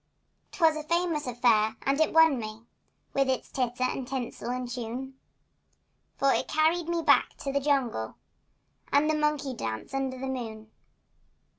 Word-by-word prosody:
'Twas 325 -4 +3
a 310 - -3
famous 330 -2 0
affair 230 -3 +3
and 275 +3 +1
it 315 - +3
won 320 -5 +5
me, 215 0 -7 0.5
With 275 -1 +2
its 260 - -2
titter 250 -1 -1
and 255 0 -1
tinsel 255 -2 -4
and 250 0 -2
tune, 245 +2 -5 1.0
For 275 0 +3
it - - 0
carried 320 +2 +1
me 340 -1 0
back 290 -2 +4
to 275 - -2
the 280 - +2
jungle 260 - 0 0.8
And 285 +2 +4
the 310 - +2
monkey 300 -3 0
dance 110 - -5
under 265 -1 -2
the 265 - -5
moon. 220 -4 -5
265 Hz, 155 wpm, -28 LUFS, 240-300 Hz, 1.0 s, won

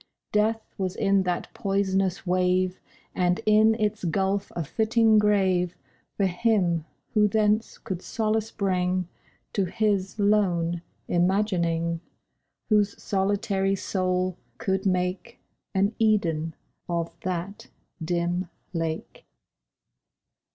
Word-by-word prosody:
Death 220 +1 0
was 185 -1 -1
in 195 -2 +3
that 180 -2 -2
poisonous 195 -3 0
wave, 185 0 +1 0.3
And 180 -1 +1
in 215 +1 +5
its 215 -2 -1
gulf 195 +3 0
a 170 - -1
fitting 220 - +3
grave 190 -4 +2 0.4
For 200 - +2
him 180 -4 +1 0.3
who 210 -1 +5
thence 215 +1 +1
could 190 -5 -5
solace 220 +1 -1
bring 185 -3 0 0.5
To 195 - +1
his 195 0 0
lone 180 -5 +2 0.3
imagining— 175 -3 +1 0.7
Whose 210 -2 +2
solitary 195 0 0
soul 185 -1 -1 0.2
could 190 0 0
make 180 0 -1 0.4
An 200 +3 +2
Eden 165 -8 +1 0.3
of 170 -1 -2
that 185 +4 -4 0.4
dim 175 +1 -1 0.2
lake. 165 -1 -4
190 Hz, 100 wpm, -26 LUFS, 180-210 Hz, 0.7 s, in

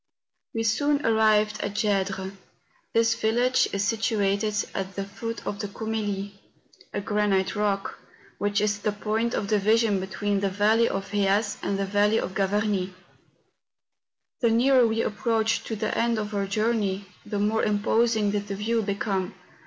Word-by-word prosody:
We 225 - 0
soon 285 +6 +1
arrived 215 -1 +3
at 200 0 -3
Gedres. 195 -2 -1 0.6
This 230 0 +3
village 245 +4 +2
is 200 0 0
situated 210 -2 0 0.2
at 195 0 -4
the 195 - -2
foot 230 +3 -6
of 200 - -4
the 205 - -3
Coumelie, 205 -1 -3 0.6
a - - -2
granite 200 -2 0
rock, 205 -1 -1 0.4
which 205 0 +1
is 210 -1 0
the 210 0 -1
point 220 +3 -1
of 200 - -2
division 215 0 +3
between 200 +2 -1
the 195 0 0
valley 215 +4 +3
of 195 0 -4
Heas 205 +1 +1
and 200 - -1
the 195 - -1
valley 205 +2 +2
of 185 - -4
Gavarnie. 195 -1 0 1.4
The 235 -4 +3
nearer 245 +2 +4
we 225 +1 0
approached 225 0 0
to 225 - -3
the 215 0 -2
end 235 0 +1
of 210 0 -3
our 200 -1 -1
journey, 205 -2 0 0.2
the 205 - -4
more 210 +2 +1
imposing 215 +1 +2
did 205 0 -2
the 200 - -3
view 225 +3 0
become. 195 -2 -2
210 Hz, 155 wpm, -26 LUFS, 200-225 Hz, 1.4 s, nearer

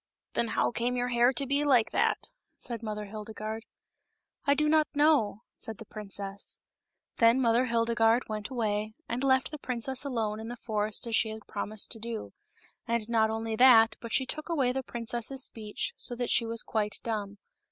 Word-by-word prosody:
" - - -56
Then 235 - 0
how 225 - +1
came 240 +1 -1
your 245 0 0
hair 240 +1 +4
to 275 +3 +2
be 280 +2 +1
like 255 -6 +4
that - - +1
?'* - - -58
said 235 -2 -5
Mother 210 -2 -4
Hildegarde. 215 +1 -6 0.4
" - - -47
I 280 - +5
do 300 +1 +2
not 310 0 +4
know," 285 -8 +3
said 220 -2 -6
the 225 - -9
princess. 200 -1 -5 0.6
Then 230 +2 +5
Mother 240 0 +3
Hildegarde 230 0 +2
went 215 -1 -4
away, 215 -3 -1
and 240 +3 -2
left 260 0 +3
the 305 - -6
princess 255 +1 -2
alone 225 -6 -2
in 220 - -6
the 240 +1 -6
forest 215 -1 -2
as 230 -1 0
she 220 - +3
had 220 -1 -8
promised 210 0 -3
to 225 - -2
do; 230 0 -5 0.5
and 230 -2 0
not 220 -2 +3
only 225 0 -2
that, 225 -3 +7
but 230 - -7
she 260 - +3
took 305 +5 -5
away 275 -7 +2
the 265 +1 -2
princess's 240 +2 -3
speech, 215 -2 -4
so 245 - -2
that 245 0 -2
she 230 - +3
was 230 0 0
quite 210 -2 -1
dumb. 205 -3 -3
230 Hz, 195 wpm, -29 LUFS, 215-250 Hz, 0.6 s, that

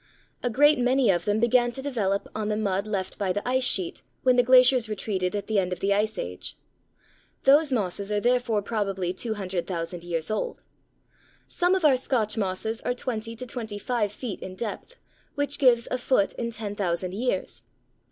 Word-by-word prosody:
A 245 - 0
great 290 +4 +5
many 250 -2 +3
of 175 +1 -1
them 210 0 +1
began 240 +1 +3
to 265 - -5
develop 205 -8 -1
on 215 -1 -3
the 210 - 0
mud 200 -1 -1
left 195 -3 -3
by 195 -3 0
the 205 +5 -3
ice 260 +1 +2
sheet 185 -8 +1 0.2
when 255 -1 +4
the 245 - +6
glaciers 250 -1 +5
retreated 195 -2 -2
at 200 -1 -3
the 215 -2 +1
end 185 -1 -1
of 180 - -3
the 200 +2 +2
Ice 215 +1 0
Age. 90 - -6 0.9
Those 285 +2 +5
mosses 200 -3 -1
are 210 - +1
therefore 240 -2 +1
probably 195 -5 -2
200,000 185 -5 -3
years 170 +1 -3
old. 480 - -3 0.8
Some 355 +1 +1
of 370 -4 0
our 275 -4 +6
Scotch 230 -5 -1
mosses 220 +2 -2
are 245 - -1
twenty 230 -2 -3
to 255 - -6
twenty 225 -4 -5
five 215 -1 -1
feet 220 0 -6
in 185 - -8
depth, 230 - -6 0.4
which 285 0 -1
gives 240 -4 +4
a 255 - 0
foot 245 -5 +2
in 235 - -3
10,000 200 -5 -2
years. 245 +5 -2
215 Hz, 180 wpm, -26 LUFS, 195-250 Hz, 0.9 s, the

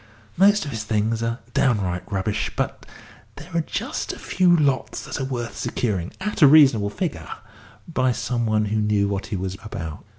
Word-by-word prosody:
Most 200 +1 +4
of 145 - -5
his 110 -2 -4
things 110 +1 0
are 115 0 -1 0.2
downright 95 -7 0
rubbish, 100 +2 -1
but - - -3 0.5
there - - -11
are 170 - +2
just - - -3
a - - -8
few 180 -2 +3
lots 140 -4 0
that - - -5
are - - -1
worth 120 -5 -4
securing, 95 -7 -2
at 210 0 -3
a 150 - +10
reasonable 135 -8 +6
figure, 165 - -4 0.6
by 130 -6 +1
some 120 -1 -1
one 110 0 +2
who 105 +1 -1
knew 105 -1 +2
what 100 -1 -3
he 110 - -4
was 95 0 -4
about." 80 -8 -6
115 Hz, 185 wpm, -23 LUFS, 100-140 Hz, 0.6 s, a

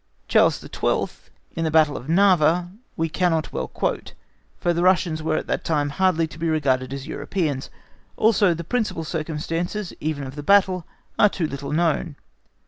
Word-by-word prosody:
Charles - - +4
XII, - - -2 0.3
in 165 - -2
the 160 - +1
battle 155 -2 +4
of 130 - -7
Narva, 175 -1 +3 0.3
we 165 - +1
cannot 165 -2 0
well 65 - -2
quote, - - -3 0.4
for 175 - 0
the 170 - -1
Russians 175 -3 +2
were 155 0 0
at - - -3
that - - -2
time 145 -3 0
hardly 180 0 +2
to 160 0 -11
be 165 0 0
regarded 130 -5 +1
as 135 0 -5
Europeans, 145 -2 -3 0.5
also 205 -5 +4
the 170 - -5
principal 215 -4 -1
circumstances, 165 +5 -3
even 150 -2 -2
of 130 - -7
the 145 - -6
battle, 185 0 +3 0.3
are 210 - +7
too 180 -4 -2
little 140 -2 -5
known. 165 -1 0
160 Hz, 170 wpm, -23 LUFS, 150-180 Hz, 0.5 s, are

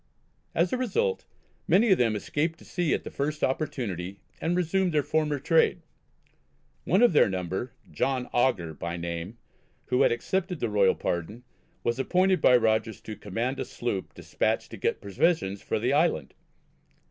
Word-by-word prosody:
As 170 +2 +2
a - - +2
result 350 - 0 0.4
many 215 +3 +4
of 190 - +5
them 115 -3 +2
escaped 155 +10 -1
to - - -16
sea 175 -3 -1
at - - -5
the - - -7
first 150 +2 -3
opportunity 100 - -2 0.2
and 175 +2 0
resumed 180 +1 +1
their 150 - +3
former 150 -1 0
trade. 165 +4 +2 1.0
One 190 +8 +3
of 240 - +5
their 150 - +5
number, 95 +6 -3 0.2
John 130 -2 -1
Augur 100 -10 +1
by 85 +3 -5
name, 85 +5 -5 0.5
who 125 - +2
had - - +5
accepted 180 - -2
the 120 - -1
royal 100 -2 +3
pardon, 95 +8 -3 0.4
was 120 +2 0
appointed 185 +7 +2
by 125 - +6
Rogers 110 -1 +1
to 110 - -7
command 115 +8 -3
a - - 0
sloop 110 -6 -4
despatched - - -1
to - - -7
get - - -1
provisions 100 - 0
for - - -2
the 120 +5 0
island. 145 - +1
125 Hz, 165 wpm, -27 LUFS, 100-165 Hz, 1.0 s, by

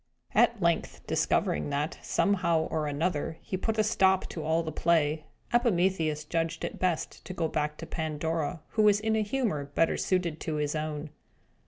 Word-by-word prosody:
At 235 -2 +4
length, 170 -2 0
discovering 75 - +1
that, 145 +3 -2
somehow 170 -5 +2
or 155 -2 0
other, 160 +1 -1
he - - -3
put 220 +4 -1
a 215 - +4
stop 190 -3 +3
to 160 - -5
all 160 +2 +1
the 160 - -4
play, 155 -1 +1 0.3
Epimetheus 180 -9 +2
judged 165 +1 -1
it - - -6
best 180 -4 -1
to 185 - -7
go 165 -2 0
back 150 -1 -2
to - - -7
Pandora, 160 +1 -2
who 220 - +1
was 205 -1 +5
in 220 +1 0
a 220 - +2
humour 210 - -1
better 145 +4 +1
suited 175 -4 0
to 160 - -3
his 150 -1 -1
own. 155 -1 -3
165 Hz, 175 wpm, -29 LUFS, 155-190 Hz, 0.3 s, was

